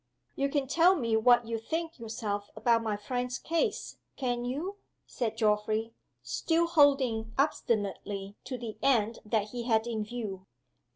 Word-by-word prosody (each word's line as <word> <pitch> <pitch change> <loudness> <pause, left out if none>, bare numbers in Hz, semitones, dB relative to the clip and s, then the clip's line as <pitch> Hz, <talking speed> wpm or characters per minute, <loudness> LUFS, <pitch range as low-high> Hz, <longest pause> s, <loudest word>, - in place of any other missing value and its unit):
"You 275 0 0
can 280 -1 0
tell 335 +7 +5
me 230 -8 0
what 240 +1 +5
you 230 0 -2
think 325 +6 -4
yourself 215 -3 -4
about 230 -1 +3
my 215 -2 -1
friend's 245 +3 -3
case 335 +7 -1 0.2
can't 245 -2 -1
you?" 335 +11 -3 0.3
said 225 -3 -3
Geoffrey, 215 +1 +1 0.3
still 335 0 +1
holding 275 -9 +3
obstinately 205 -7 -1
to 255 0 -4
the 230 -3 -7
end 230 -5 +2
that 215 -1 0
he 240 0 -5
had 225 -2 +2
in 225 -3 -2
view. 210 -4 -6
235 Hz, 150 wpm, -30 LUFS, 220-275 Hz, 0.3 s, tell